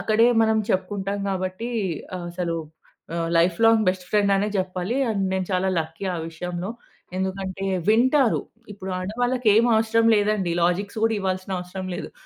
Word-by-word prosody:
అక్కడే 220 +1 +3 0.2
మనం 220 0 +3
చెప్పుకుంటాం 195 +1 -1
గాబట్టి 185 +5 -3 0.5
ఆహ్, 175 -1 -6
అసలు 170 -1 -2 0.6
ఆహ్, 165 0 -1
లైఫ్ 170 0 +2
లాంగ్ 225 -1 +5
బెస్ట్ 185 -1 -7
ఫ్రెండ్ 205 -1 +3
అనే 205 +2 0
జెప్పాలి. 185 +6 -2
అండ్ 200 -3 0
నేను 185 -1 -1
చాలా 185 +1 +1
లక్కీ 160 +4 -6
ఆ - - -3
విషయంలో 175 +4 -5 0.5
ఎందుకంటే 190 0 -3 0.3
వింటారు. 255 +2 +4 0.3
ఇప్పుడు 190 -1 -7
ఆడవాళ్ళకి 245 +5 0
ఏం 225 +2 +5
అవసరం 225 +1 +3
లేదండి 205 -3 +1
లాజిక్స్ 200 +5 0
కూడా 225 0 +2
ఇవ్వాల్సిన 185 0 -2
అవసరం 185 +1 -6
లేదు. 190 - -6
195 Hz, 150 wpm, -24 LUFS, 185-220 Hz, 0.6 s, లాంగ్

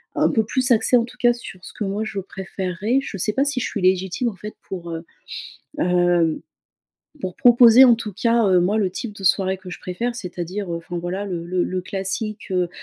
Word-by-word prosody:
un - - +3
peu 220 - +2
plus 255 +3 0
axées 240 +2 +4
en 230 - +1
tout 250 +1 -15
cas 240 0 +5
sur 195 -6 -8
ce - - -7
que 210 - -4
moi 200 +2 -2
je 215 -2 -4
préférerais. 190 +4 -2
Je 270 - -7
sais 210 +4 0
pas 275 +1 +2
si 275 -4 -1
je - - -1
suis 205 - -4
légitime 190 +5 +1
en 205 - -9
fait 210 +3 -9
pour, 175 -3 -6
heu, 165 0 -6 0.7
hem, 175 - +2 0.8
pour 185 -1 -4
proposer 240 +1 +7
en 240 -2 +6
tout 215 -2 -6
cas, 230 +2 +2
heu, 185 -1 +4
moi 200 +5 +1
le 195 -4 +1
type 210 +3 -5
de 195 - -10
soirée 190 0 +2
que 185 -1 -11
je - - -7
préfère 230 +7 -3
c'est-à-dire, 180 -2 -5
heu, - - -2
enfin 175 +1 -6
voilà 185 +4 -3
le 175 -4 -4
le 180 0 0
le 185 0 -2
classique, 195 +3 -4
heu 180 -2 +1
195 Hz, 225 wpm, -22 LUFS, 180-230 Hz, 0.8 s, proposer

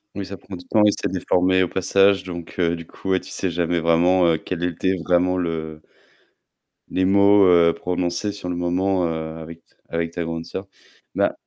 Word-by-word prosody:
Oui, 100 -2 -5
ça 100 0 -8
prend 95 - -10
du 90 - -11
temps, 105 - +3
et 105 - +5
c'est 100 - -3
déformé 95 0 +2
au 90 - 0
passage, 95 +1 +2
donc, 85 -1 -8
heu, 85 -1 +2
du 85 -1 -9
coup, 95 - -9
ouais, 95 - +3
tu - - -13
sais 95 - -2
jamais 85 0 -1
vraiment, 85 +2 +3
heu, 80 -1 +3
quel 85 +1 -5
était 90 +2 0
vraiment 90 +1 +2
le 80 -3 -4 1.1
Les 95 - 0
mots, 100 +1 +5
heu, 85 -2 +5
prononcés 90 +3 -2
sur 100 -3 -7
le 90 - -2
moment, 90 +1 0
heu, 80 0 -5
avec 80 +1 -10
ta - - -34
avec 85 0 -2
ta 85 0 -4
grande 80 0 -5
sœur. 95 +1 -7 0.5
Bah - - +1
90 Hz, 205 wpm, -22 LUFS, 85-95 Hz, 1.1 s, et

